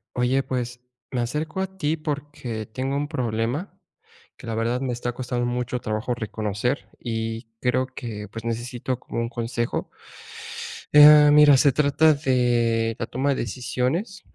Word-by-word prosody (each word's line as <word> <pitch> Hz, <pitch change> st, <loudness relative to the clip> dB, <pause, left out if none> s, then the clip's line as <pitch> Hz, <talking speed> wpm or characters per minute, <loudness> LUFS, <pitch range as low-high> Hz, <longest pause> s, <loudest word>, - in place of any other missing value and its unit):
Oye, 125 Hz, +2 st, +2 dB
pues, 125 Hz, -2 st, -3 dB, 0.3 s
me 125 Hz, -2 st, -1 dB
acerco 150 Hz, +8 st, -3 dB
a 190 Hz, 0 st, -3 dB
ti 160 Hz, -2 st, 0 dB
porque 145 Hz, -7 st, -5 dB
tengo 130 Hz, +4 st, -3 dB
un 145 Hz, +1 st, -1 dB
problema, 125 Hz, -, -2 dB, 0.6 s
que -, -, -12 dB
la 115 Hz, -, -3 dB
verdad, 115 Hz, +2 st, 0 dB
me 130 Hz, -2 st, -1 dB
está 120 Hz, 0 st, -3 dB
costando 125 Hz, 0 st, -3 dB
mucho 125 Hz, 0 st, -2 dB
trabajo 110 Hz, +2 st, -2 dB
reconocer 110 Hz, +2 st, -2 dB
y 115 Hz, 0 st, -4 dB
creo 130 Hz, +1 st, +1 dB
que, 115 Hz, -6 st, -7 dB
pues, 115 Hz, +2 st, -8 dB
necesito 120 Hz, +2 st, -3 dB
como 115 Hz, -, -5 dB
un 115 Hz, -, -2 dB
consejo. 120 Hz, 0 st, -3 dB, 1.0 s
Eh 150 Hz, 0 st, +9 dB
mira, 150 Hz, -2 st, +8 dB
se 140 Hz, +1 st, +5 dB
trata 150 Hz, +3 st, +4 dB
de 120 Hz, -5 st, +1 dB
la 115 Hz, -, -2 dB
toma 135 Hz, +3 st, -1 dB
de 140 Hz, -, +2 dB
decisiones, 130 Hz, -, -2 dB
125 Hz, 150 wpm, -24 LUFS, 115-145 Hz, 1.0 s, Eh